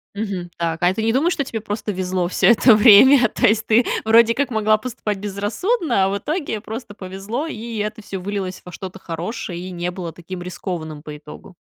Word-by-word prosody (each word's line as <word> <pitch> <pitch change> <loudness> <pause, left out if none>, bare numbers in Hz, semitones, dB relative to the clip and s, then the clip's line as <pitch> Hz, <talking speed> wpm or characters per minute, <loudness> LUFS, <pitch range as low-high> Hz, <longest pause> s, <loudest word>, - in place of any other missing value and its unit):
Мгм. 195 -5 -4
Так, 165 -1 -1
а 180 +1 +4
ты 220 - -3
не 225 +1 +1
думаешь, 315 +8 +2
что 280 - -1
тебе 225 -3 -5
просто 210 0 -4
везло 185 -2 -1
всё - - +2
это 235 0 +6
время? 240 +4 +7
То - - +2
есть, 220 +1 +2
ты, 230 +2 +4 0.2
вроде 230 +1 +5
как, 280 -2 -1
могла 215 -1 +3
поступать 220 -3 -4
безрассудно, 210 - 0
а - - +1
в 200 - -1
итоге 295 - -3
просто 220 0 -7
повезло, 200 - -5
и 230 -5 -6
это 210 +1 -3
всё 195 - -6
вылилось 190 -1 -4
во 180 - -10
что-то 190 +1 -8
хорошее, 175 +2 -5
и 185 +1 -7
не 175 0 -3
было 175 -3 -6
таким 175 +2 -8
рискованным 170 -4 -6
по 150 -1 -8
итогу. 150 +5 -13
205 Hz, 205 wpm, -21 LUFS, 185-230 Hz, 0.2 s, время